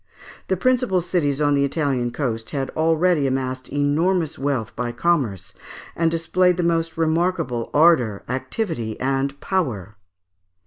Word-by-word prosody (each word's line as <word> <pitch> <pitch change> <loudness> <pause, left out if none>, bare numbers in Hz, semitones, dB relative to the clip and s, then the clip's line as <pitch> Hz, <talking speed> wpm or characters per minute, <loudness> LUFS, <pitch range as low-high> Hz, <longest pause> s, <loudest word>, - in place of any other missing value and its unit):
The 190 - 0
principal 250 -3 +2
cities 165 -5 0
on 145 -1 +2
the 140 0 +2
Italian 140 -4 0
coast 115 -4 -3
had 135 -2 -3
already 160 -1 +2
amassed 130 -1 -3
enormous 155 +4 0
wealth 130 -5 -2
by 120 0 -2
commerce, 120 - -1 0.4
and 165 -1 +2
displayed 180 +2 +1
the 180 - 0
most 165 -1 0
remarkable 160 -7 0
ardour, 145 -10 +3
activity, 130 - -3
and 135 +1 -1
power. 115 - -2
145 Hz, 130 wpm, -22 LUFS, 130-170 Hz, 0.4 s, ardour